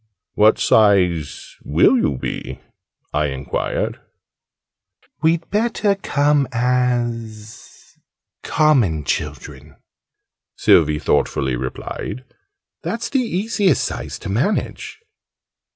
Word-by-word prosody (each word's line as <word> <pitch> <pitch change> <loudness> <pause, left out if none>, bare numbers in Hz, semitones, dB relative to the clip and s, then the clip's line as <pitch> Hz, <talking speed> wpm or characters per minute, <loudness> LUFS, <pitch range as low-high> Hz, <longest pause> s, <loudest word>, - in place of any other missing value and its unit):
"What 105 +1 +4
size 90 - +2
will - - +4
you 70 - +1
be?" - - -5 0.5
I 75 0 +1
enquired. 70 0 -3 1.2
"We'd 165 +1 +1
better 210 -1 +1
come 145 -7 +1
as 120 -3 -3 0.4
common 120 - +2
children," - - -5 0.8
Sylvie 75 - +4
thoughtfully 65 -3 0
replied. 65 - -5 0.6
"That's 230 +1 -4
the 270 - +2
easiest 205 - +1
size - - -5
to - - -8
manage." 140 - -2
120 Hz, 85 wpm, -20 LUFS, -, 1.2 s, What